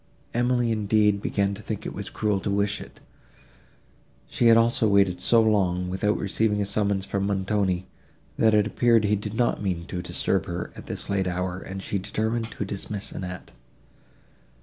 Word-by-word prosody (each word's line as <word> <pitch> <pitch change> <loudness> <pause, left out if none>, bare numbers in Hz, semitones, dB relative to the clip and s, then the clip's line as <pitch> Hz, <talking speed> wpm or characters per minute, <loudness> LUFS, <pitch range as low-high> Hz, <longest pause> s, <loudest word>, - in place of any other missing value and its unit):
Emily, 120 0 +1
indeed, 105 -1 +2
began 100 -1 0
to 100 - -8
think - - -5
it - - -4
was - - -6
cruel 105 -2 0
to 100 - -3
wish 100 +1 0
it; - - -12 1.3
she 120 - +2
had 115 0 +7
also 115 -1 +3
waited 100 -3 +3
so 115 - +4
long, 90 -4 +1
without 105 +3 +1
receiving 105 +1 0
a 100 - +1
summons 100 -1 0
from 100 0 -1
Montoni, 95 -2 0 0.5
that 110 -1 +4
it 105 -1 +4
appeared 115 +1 +3
he 105 0 +2
did 105 +1 -5
not 120 -2 +1
mean 90 -4 -2
to 90 0 -4
disturb 90 - -1
her, 85 0 -4
at - - -11
this - - -5
late 95 -1 0
hour, 90 0 -2
and 95 0 -7
she 100 - -2
determined 110 +4 -2
to 105 - -5
dismiss 100 +1 -4
Annette. 90 -1 -7
100 Hz, 175 wpm, -25 LUFS, 95-110 Hz, 1.3 s, had